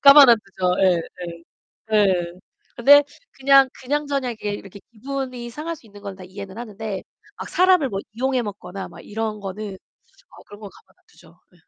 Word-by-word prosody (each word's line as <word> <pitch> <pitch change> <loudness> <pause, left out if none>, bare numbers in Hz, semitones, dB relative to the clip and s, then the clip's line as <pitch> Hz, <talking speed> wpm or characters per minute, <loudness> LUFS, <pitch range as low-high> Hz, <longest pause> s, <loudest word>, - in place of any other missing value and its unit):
가만 280 -1 +10
안 235 - +8
두죠. 185 -2 -1
예예. 180 -3 +4 0.9
예. 185 -5 +3 0.4
근데 285 +4 +8 0.3
그냥 275 0 +5
그냥저냥 280 -1 -2
이렇게 210 -2 -4
이렇게 200 0 -10
기분이 255 0 -5
상할 315 +7 -5
수 255 - -20
있는 205 -1 -14
건 195 -1 -7
다 185 - -11
이해는 195 +2 -9
하는데 220 -3 -5 0.4
막 - - -6
사람을 365 -6 +4
뭐 195 -4 -3
이용해 255 +2 0
먹거나 195 -3 -7
막 - - -13
이런 215 0 -4
거는 200 +1 -6 0.6
어 - - -15
그런 205 0 -13
건 205 -2 -9
가만 - - -22
안 - - -36
두죠. - - -21
예. - - -25
220 Hz, 330 characters per minute, -22 LUFS, 195-270 Hz, 0.9 s, 가만